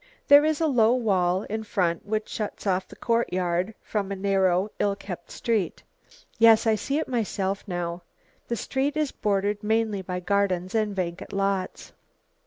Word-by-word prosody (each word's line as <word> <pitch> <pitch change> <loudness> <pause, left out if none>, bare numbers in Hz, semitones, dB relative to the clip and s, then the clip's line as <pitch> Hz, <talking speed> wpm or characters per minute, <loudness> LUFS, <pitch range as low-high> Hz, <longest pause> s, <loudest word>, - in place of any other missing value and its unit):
"There 285 +1 +9
is 310 -1 +1
a 325 - +2
low 245 -5 +4
wall 190 -5 +1
in 220 +1 -4
front 180 -4 -1
which 215 0 -1
shuts 215 -1 -5
off 185 -1 0
the - - -13
courtyard 185 -4 0
from 200 -2 -2
a - - -1
narrow, 190 0 +1
ill 200 -1 +1
kept 180 -4 -8
street." 220 -7 -2 0.6
"Yes, 225 0 +6
I 225 - +4
see 275 +6 -1
it 315 - -1
myself 200 -5 -2
now. 175 -1 -3 0.5
The 235 - -1
street 275 +6 -1
is 305 -3 0
bordered 205 -1 -1
mainly 220 -2 +1
by 180 -1 -4
gardens 185 -1 0
and 215 -2 0
vacant 175 -2 -4
lots." 195 -1 -2
200 Hz, 165 wpm, -26 LUFS, 185-225 Hz, 0.6 s, There